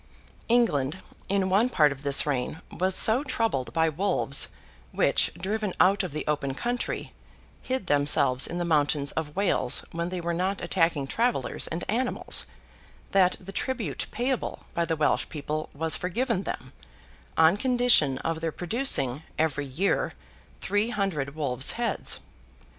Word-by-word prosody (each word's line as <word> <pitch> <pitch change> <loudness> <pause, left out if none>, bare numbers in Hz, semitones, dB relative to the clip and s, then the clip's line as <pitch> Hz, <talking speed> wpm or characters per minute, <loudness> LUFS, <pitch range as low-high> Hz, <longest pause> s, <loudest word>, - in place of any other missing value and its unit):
England, 175 - +2 0.3
in 195 -1 +1
one 205 +6 +2
part 150 -10 +3
of 135 -1 -7
this 140 -1 +5
reign, 140 +1 -2
was 185 +1 -1
so 235 +5 +5
troubled 225 - -2
by 160 0 +2
wolves, 160 -4 +3 0.4
which, - - +2
driven 205 +1 -3
out 195 +2 +4
of 185 -5 -5
the 150 - -5
open 140 -3 -1
country, 245 - -3 0.5
hid 260 -5 -3
themselves 145 -4 +3
in 175 - -5
the 175 - -2
mountains 145 -3 +1
of 150 -2 -5
Wales 190 -10 +1
when 170 +1 -3
they 180 0 -4
were 170 0 -2
not 185 +3 -1
attacking 165 -6 0
travellers 230 - 0
and 165 +2 -4
animals, 245 +4 -1 0.6
that 190 -2 +3
the 195 +1 -10
tribute 215 - -3
payable 250 +1 -3
by 170 -1 0
the 165 0 -1
Welsh 150 -1 0
people 155 0 -4
was 160 +2 +2
forgiven 225 +3 -1
them, 130 - -6 0.6
on 160 +3 +5
condition 245 - +3
of 165 0 -2
their 165 -1 -2
producing, 175 - +2 0.2
every 145 -2 -1
year, 160 +10 -1 0.5
three 205 +3 0
hundred 175 - -2
wolves' 135 -4 +2
heads. 235 0 0
170 Hz, 145 wpm, -26 LUFS, 145-205 Hz, 0.6 s, this